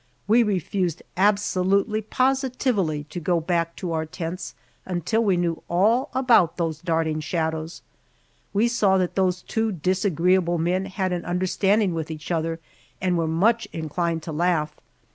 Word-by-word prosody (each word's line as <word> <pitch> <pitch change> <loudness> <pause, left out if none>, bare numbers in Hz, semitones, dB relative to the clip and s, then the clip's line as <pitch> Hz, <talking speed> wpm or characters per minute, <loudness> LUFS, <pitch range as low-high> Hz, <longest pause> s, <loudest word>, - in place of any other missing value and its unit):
We 225 +3 +5
refused 185 -4 -1
absolutely, 200 +1 +2
positively, 255 - 0
to 175 - -4
go 175 +1 +1
back 170 0 -1
to 180 -3 -4
our 160 0 -2
tents 170 +2 -6 0.3
until 190 +5 0
we 195 -4 +2
knew 170 -2 -1
all 220 - +2
about 240 -10 +4
those 165 -3 -2
darting 160 -2 0
shadows. 160 0 -3 0.7
We 210 +4 +2
saw 205 -5 +3
that 180 -2 0
those 185 -2 0
two 225 -1 -1
disagreeable 180 0 +1
men 180 +3 0
had 190 -1 -2
an 175 - -3
understanding 185 +2 +1
with 160 -1 -4
each 155 +1 -6
other 165 0 -1 0.4
and 180 -1 +1
were 165 -1 0
much 215 +9 +2
inclined 165 +1 -2
to 160 - -5
laugh. 155 -2 0
180 Hz, 145 wpm, -24 LUFS, 165-200 Hz, 0.7 s, We